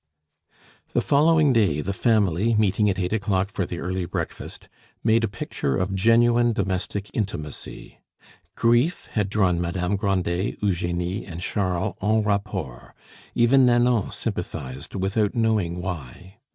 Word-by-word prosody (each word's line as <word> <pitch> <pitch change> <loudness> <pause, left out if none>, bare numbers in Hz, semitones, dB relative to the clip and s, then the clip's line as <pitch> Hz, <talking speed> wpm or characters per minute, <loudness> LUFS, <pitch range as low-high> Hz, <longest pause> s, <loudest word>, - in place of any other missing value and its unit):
IX - - -34
The - - +2
following 150 -1 +4
day 100 -11 +2
the 100 +6 -2
family, 105 0 +2
meeting 105 0 +2
at 95 - -1
eight 90 +1 -1
o'clock 100 -2 0
for 95 -3 -2
the 85 - -5
early 90 +1 -3
breakfast, - - -5 0.4
made 115 0 +3
a - - +2
picture 70 -8 -3
of 90 +1 -1
genuine 120 +4 +4
domestic 100 0 -2
intimacy. 75 -9 -5 0.6
Grief 120 +9 +2
had 105 -3 0
drawn 95 -4 +2
Madame 90 +2 -1
Grandet, 95 -2 -1
Eugenie, 90 0 -1
and 85 -2 -8
Charles 90 -1 -1
en 110 +2 +2
rapport; 100 - -3 0.4
even 125 +3 +5
Nanon 120 -3 +2
sympathized, 65 +7 -5
without 100 +2 0
knowing 105 -7 +1
why. 90 - -7
100 Hz, 135 wpm, -24 LUFS, 90-110 Hz, 0.6 s, even